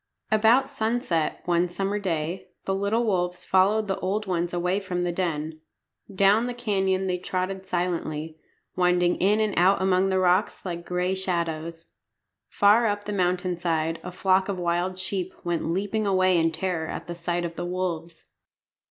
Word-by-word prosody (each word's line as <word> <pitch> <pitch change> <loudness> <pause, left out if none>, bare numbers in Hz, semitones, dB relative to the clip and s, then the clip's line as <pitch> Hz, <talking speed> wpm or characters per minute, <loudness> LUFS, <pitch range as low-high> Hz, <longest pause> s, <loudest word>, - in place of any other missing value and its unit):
About 225 +5 +4
sunset, 220 - -1
one 175 0 +2
summer 195 +4 -2
day, 170 -2 -3 0.2
the 195 - 0
little 200 +4 +1
wolves 180 -3 -1
followed 205 +3 +3
the 195 - -2
old 205 +3 -1
ones 175 -2 -1
away 180 +2 0
from 180 -3 -3
the 175 - 0
den. 160 -3 -3 0.5
Down 200 +4 +3
the 245 - -4
canyon 195 -5 0
they 180 -1 -1
trotted 185 +1 -3
silently, 165 -3 -2 0.4
winding 180 -1 +2
in 205 +3 +3
and 215 -2 +1
out 190 +3 +4
among 190 0 +2
the 190 - +1
rocks 185 +3 +1
like 170 -2 -5
gray 180 +1 0
shadows. 170 -3 -3 0.6
Far 210 +3 +4
up 205 0 -1
the 210 - -4
mountain 180 -1 0
side 165 -1 -1
a 180 - -6
flock 190 +1 +2
of 195 - -2
wild 175 +1 -1
sheep 185 -1 -3
went 170 -2 -1
leaping 205 +4 -1
away 185 -1 +3
in 165 -1 +3
terror 165 -1 -2
at - - -6
sight 175 +1 -2
of 170 -1 -5
the 175 - -4
wolves. 170 -2 -4
185 Hz, 165 wpm, -25 LUFS, 175-195 Hz, 0.6 s, About